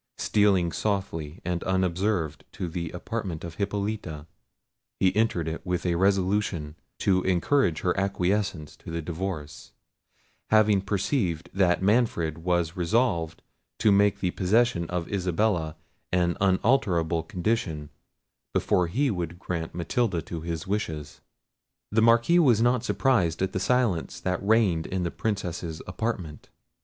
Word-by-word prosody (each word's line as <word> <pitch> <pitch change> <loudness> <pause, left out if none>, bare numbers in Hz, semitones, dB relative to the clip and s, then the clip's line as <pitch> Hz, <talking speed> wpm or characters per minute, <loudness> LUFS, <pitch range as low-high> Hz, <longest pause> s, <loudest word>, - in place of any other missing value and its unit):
Stealing 95 -5 +2
softly 85 -4 -3
and 90 -1 -2
unobserved 95 -3 0
to 90 - -4
the 85 0 -4
apartment 90 -2 -5
of 85 -1 -7
Hippolita, 100 -7 -3 0.7
he 95 -1 +3
entered 105 -7 +1
it 80 0 -4
with 90 -1 -2
a 90 - +2
resolution 95 -4 +1 0.2
to 95 -2 +2
encourage 90 - +2
her 90 - +1
acquiescence 95 -4 -1
to - - -11
the 85 0 -3
divorce, 80 -3 -5 0.8
having 110 -2 +4
perceived 100 - -1
that 95 -1 +2
Manfred 95 -7 +1
was 85 0 0
resolved 85 -4 0 0.3
to 110 - +4
make 100 0 +3
the 90 - +1
possession 95 -3 +1
of 90 -2 -2
Isabella 90 -3 0 0.4
an 90 -1 +2
unalterable 95 -5 +2
condition, 85 -4 -2 0.6
before 90 -1 +2
he 130 +10 +1
would 85 -3 -4
grant 85 -3 -4
Matilda 90 +3 0
to 85 -2 -6
his 80 -1 -4
wishes. 80 -8 -4 0.7
The 110 +2 +3
Marquis 115 +9 +5
was 125 -10 +5
not 120 0 +2
surprised 95 - +1
at 95 - -1
the 95 - -1
silence 115 -6 0
that 90 +1 -2
reigned 100 -6 +2
in 95 -1 -2
the 85 - -2
Princess's 90 -6 -3
apartment. 90 -5 -4
90 Hz, 130 wpm, -26 LUFS, 85-105 Hz, 0.8 s, Marquis